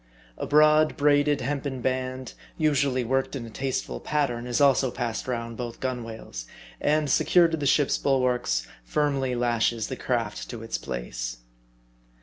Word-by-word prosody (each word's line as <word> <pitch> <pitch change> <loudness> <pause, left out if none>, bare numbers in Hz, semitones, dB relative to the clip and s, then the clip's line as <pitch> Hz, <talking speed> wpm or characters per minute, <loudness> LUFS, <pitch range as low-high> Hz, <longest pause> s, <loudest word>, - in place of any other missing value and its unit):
A - - -5
broad, 155 +1 +5
braided, 145 -1 +3
hempen 140 0 -2
band, 130 0 -2 0.2
usually 140 -4 +2
worked 135 +4 0
in 125 -4 -5
a 115 - -10
tasteful 130 +4 -3
pattern, 125 -5 -1
is 120 - 0
also 135 -2 +4
passed 120 -1 -3
round 115 -2 -3
both 120 -2 -5
gunwales; 115 - -5 0.3
and 150 0 +2
secured 170 +5 +4
to 160 - 0
the 145 -2 -1
ship's 145 +1 +3
bulwarks, 125 - +1 0.2
firmly 135 - 0
lashes 120 -2 0
the 130 - -3
craft 115 -5 -2
to 115 -2 -7
its 115 - -3
place. - - -5
130 Hz, 145 wpm, -26 LUFS, 115-145 Hz, 0.3 s, broad